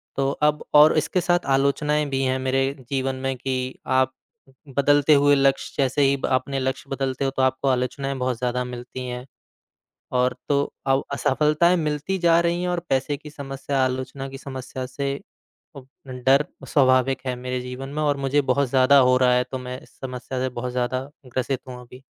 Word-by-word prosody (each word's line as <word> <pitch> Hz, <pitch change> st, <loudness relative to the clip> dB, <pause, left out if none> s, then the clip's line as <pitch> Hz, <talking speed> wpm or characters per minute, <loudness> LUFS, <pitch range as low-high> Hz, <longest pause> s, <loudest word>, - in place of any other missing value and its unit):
तो 135 Hz, 0 st, +1 dB
अब 150 Hz, +1 st, +1 dB
और 150 Hz, +2 st, +7 dB
इसके 155 Hz, +4 st, +1 dB
साथ 175 Hz, +1 st, +1 dB
आलोचनाएँ 150 Hz, +2 st, +1 dB
भी 135 Hz, 0 st, -1 dB
हैं 130 Hz, 0 st, +1 dB
मेरे 130 Hz, 0 st, +1 dB, 0.3 s
जीवन 135 Hz, -1 st, -1 dB
में 135 Hz, 0 st, 0 dB
कि 130 Hz, 0 st, -3 dB
आप 130 Hz, 0 st, +2 dB, 0.6 s
बदलते 145 Hz, +1 st, +4 dB
हुए 145 Hz, 0 st, +5 dB
लक्ष्य 135 Hz, 0 st, +1 dB
जैसे 135 Hz, +2 st, 0 dB
ही 140 Hz, 0 st, +4 dB
ब -, -, -3 dB
अपने 135 Hz, +1 st, 0 dB
लक्ष्य 130 Hz, 0 st, -3 dB
बदलते 135 Hz, 0 st, -2 dB
हो, 135 Hz, -, 0 dB
तो 135 Hz, -, -2 dB
आपको 130 Hz, +1 st, +1 dB
आलोचनाएँ 135 Hz, +2 st, -1 dB
बहुत 125 Hz, -2 st, -1 dB
ज़्यादा 125 Hz, 0 st, -1 dB
मिलती 125 Hz, +1 st, -7 dB
हैं। 125 Hz, 0 st, -5 dB, 0.9 s
और 125 Hz, 0 st, +1 dB
तो 140 Hz, -1 st, +3 dB, 0.2 s
अव 135 Hz, 0 st, +2 dB
असफलताएँ 150 Hz, +6 st, +2 dB
मिलती 155 Hz, +4 st, -1 dB
जा 170 Hz, -1 st, +4 dB
रही 170 Hz, +1 st, 0 dB
हैं 180 Hz, -, -1 dB
और 175 Hz, -1 st, -1 dB
पैसे 135 Hz, +2 st, 0 dB
की 150 Hz, +1 st, -12 dB
समस्या, 140 Hz, -1 st, -4 dB
आलोचना 130 Hz, +1 st, -3 dB
की 135 Hz, 0 st, -9 dB
समस्या 130 Hz, -1 st, -6 dB
से 140 Hz, +2 st, -3 dB, 0.6 s
अव 135 Hz, -2 st, -11 dB, 0.2 s
नडर 130 Hz, +3 st, +2 dB, 0.2 s
स्वाभाविक 130 Hz, -1 st, +3 dB
है 130 Hz, -1 st, -1 dB
मेरे 125 Hz, 0 st, -4 dB
जीवन 125 Hz, +2 st, -7 dB
में 150 Hz, +2 st, -3 dB
और 145 Hz, -1 st, +1 dB
मुझे 140 Hz, +1 st, +1 dB
बहुत 140 Hz, -1 st, 0 dB
ज़्यादा 130 Hz, +2 st, +5 dB
हो 125 Hz, -1 st, +5 dB
रहा 125 Hz, -1 st, +4 dB
है 125 Hz, -, +3 dB
तो 130 Hz, -, -2 dB
मैं 125 Hz, 0 st, -6 dB
इस -, -, -21 dB
समस्या 130 Hz, 0 st, -5 dB
से 130 Hz, -, 0 dB
बहुत 125 Hz, 0 st, -5 dB
ज़्यादा 130 Hz, +2 st, -2 dB, 0.2 s
ग्रसित 130 Hz, +1 st, -2 dB
हूँ 125 Hz, -1 st, -8 dB
अभी। 125 Hz, +2 st, -14 dB
135 Hz, 190 wpm, -23 LUFS, 130-140 Hz, 0.9 s, और